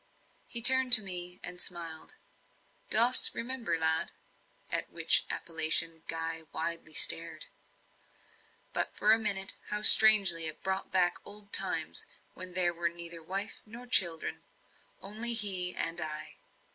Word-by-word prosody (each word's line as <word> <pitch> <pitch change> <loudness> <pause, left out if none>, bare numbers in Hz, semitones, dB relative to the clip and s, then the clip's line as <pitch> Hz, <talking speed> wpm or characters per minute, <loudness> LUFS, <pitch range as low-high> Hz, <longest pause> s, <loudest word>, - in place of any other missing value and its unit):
He 235 -1 -1
turned 260 +1 +5
to 230 -4 +7
me 180 -1 -6
and 180 0 -7
smiled. 170 - -1 0.7
"Dost 240 +3 +5
remember, 230 -8 -6
lad?" 160 0 +1 0.6
at - - -4
which - - +1
appellation 160 0 0
Guy 165 0 -7
widely 165 -1 -8
stared. 165 - 0 1.3
But, - - -4
for 210 - +1
a 225 - -1
minute, 200 -3 -2
how 210 0 -6
strangely 195 -8 +7
it 155 - -7
brought 190 0 -6
back 180 -2 -1
old 205 0 -8
times, - - +2 0.3
when 185 -1 -12
there 175 -1 0
were 170 0 -5
neither 170 0 -8
wife 195 +5 -7
nor 235 +3 -15
children 175 -9 -1 0.6
only 225 +4 -2
he 185 -5 0
and 165 0 -5
I! 155 0 -10
180 Hz, 135 wpm, -27 LUFS, 165-215 Hz, 1.3 s, to